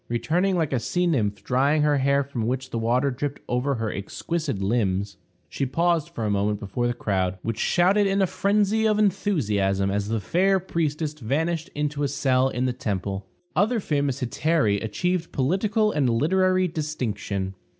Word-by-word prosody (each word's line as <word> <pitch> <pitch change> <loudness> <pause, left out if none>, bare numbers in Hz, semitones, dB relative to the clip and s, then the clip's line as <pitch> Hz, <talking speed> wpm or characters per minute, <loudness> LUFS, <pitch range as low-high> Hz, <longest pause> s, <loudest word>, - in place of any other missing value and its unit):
Returning 175 +11 +1
like 160 -5 0
a 130 - +2
sea 180 +9 0
nymph, 110 - 0
drying 140 +4 +2
her 145 -2 +3
hair 140 +1 +2
from 125 -5 -3
which 130 +1 -3
the 115 - -2
water 125 +5 +1
dripped 140 +3 -4
over 125 +3 0
her 115 -2 -2
exquisite 145 - -3
limbs, 100 -2 0 0.3
she - - -4
paused 165 +4 +1
for 115 - -4
a - - 0
moment 100 +1 0
before 115 +4 -2
the 120 - -1
crowd, 95 -4 -1
which 115 -1 -3
shouted 195 +4 +3
in 195 0 +1
a 195 - +4
phrensy 205 +4 +1
of 210 - +2
enthusiasm 105 - +1
as 100 0 -1
the 115 0 0
fair 190 - +2
priestess 155 -4 -2
vanished 160 +6 -2
into 150 0 -2
a 145 - +2
cell 130 -1 +2
in 125 0 -2
the 125 - 0
temple. 100 -4 -3 0.3
Other 225 +5 +2
famous 145 -7 -1
hetairæ 125 -5 +1
achieved 175 - -1
political 200 - +1
and 140 -7 +1
literary 185 +9 +2
distinction. 110 - -3
140 Hz, 170 wpm, -24 LUFS, 115-175 Hz, 0.3 s, a